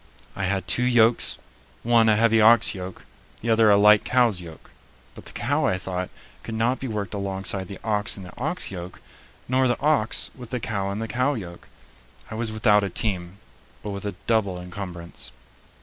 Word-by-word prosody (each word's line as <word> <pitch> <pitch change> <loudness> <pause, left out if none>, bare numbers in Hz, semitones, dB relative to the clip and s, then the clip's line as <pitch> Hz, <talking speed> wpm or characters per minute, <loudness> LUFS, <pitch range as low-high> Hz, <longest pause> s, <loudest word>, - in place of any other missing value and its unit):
I 95 - -2
had 95 0 -1
two - - +2
yokes, 120 -2 +3 0.5
one 115 -1 +4
a 110 - +5
heavy 115 0 +4
ox 115 +1 +6
yoke, 95 -1 -8 0.4
the 115 - 0
other 110 -1 +5
a 100 - +6
light 105 0 +6
cow's 120 -7 +2
yoke; 80 -3 -12 0.4
but - - -13
the - - -9
cow, - - 0
I 90 - +1
thought, 90 0 -4 0.3
could 115 - -6
not 120 +4 +1
be 135 - -4
worked 105 -4 -4
alongside 95 -1 -2
the 100 - -8
ox 105 -1 0
in 95 - -8
the 90 - -11
ox 155 - -3
yoke, 90 -1 -8 0.5
nor 130 +1 +2
the 120 - 0
ox 145 -8 +1
with 125 -3 -11
the 125 - -2
cow 100 -3 -2
in 100 - -3
the 115 +1 -3
cow 130 +5 0
yoke. 85 -6 -8 0.6
I - - -5
was 110 0 -2
without 110 -1 +3
a 100 - -1
team, 95 -2 -2 0.5
but 105 - -4
with 100 0 -6
a 100 - -4
double 100 -6 +1
encumbrance. 90 -2 -6
105 Hz, 195 wpm, -24 LUFS, 95-115 Hz, 0.6 s, ox